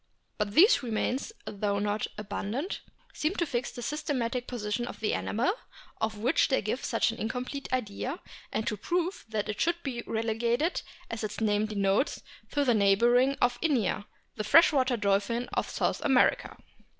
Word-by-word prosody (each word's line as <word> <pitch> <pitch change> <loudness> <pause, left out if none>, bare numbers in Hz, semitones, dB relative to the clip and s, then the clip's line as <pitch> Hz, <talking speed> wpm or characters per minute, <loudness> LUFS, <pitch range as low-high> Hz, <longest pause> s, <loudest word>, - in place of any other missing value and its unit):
But 210 -1 -1
these 395 +4 +7
remains, 250 - -1
though 200 0 -1
not 205 +1 -1
abundant, 210 - -3 0.3
seem 310 +6 -1
to 340 - +1
fix 250 -5 -2
the 245 - -7
systematic 255 -3 -2
position 235 0 -2
of - - -8
the 220 - 0
animal, 245 - 0 0.4
of 220 -1 -2
which 245 +9 +3
they 265 - +2
give 215 +6 -2
such - - +1
an 230 - -9
incomplete 250 +5 -4
idea, 255 - -2 0.3
and 220 - -1
to - - -1
prove 355 - -1
that 215 -1 -2
it 210 -1 -3
should 340 +1 +1
be 250 -4 -3
relegated, 230 +8 0 0.3
as 230 -1 -4
its 210 -1 -4
name 210 -1 +2
denotes, 200 +4 +1 0.3
to 290 -1 +2
the 245 - +4
neighbourhood 235 +6 +4
of 245 0 +1
Inia, 255 - +1 0.3
the 215 - -1
fresh 320 +11 +6
water 260 -3 +2
dolphin 205 +4 +1
of - - -1
South - - -1
America. 290 - +3
235 Hz, 165 wpm, -29 LUFS, 210-275 Hz, 0.4 s, these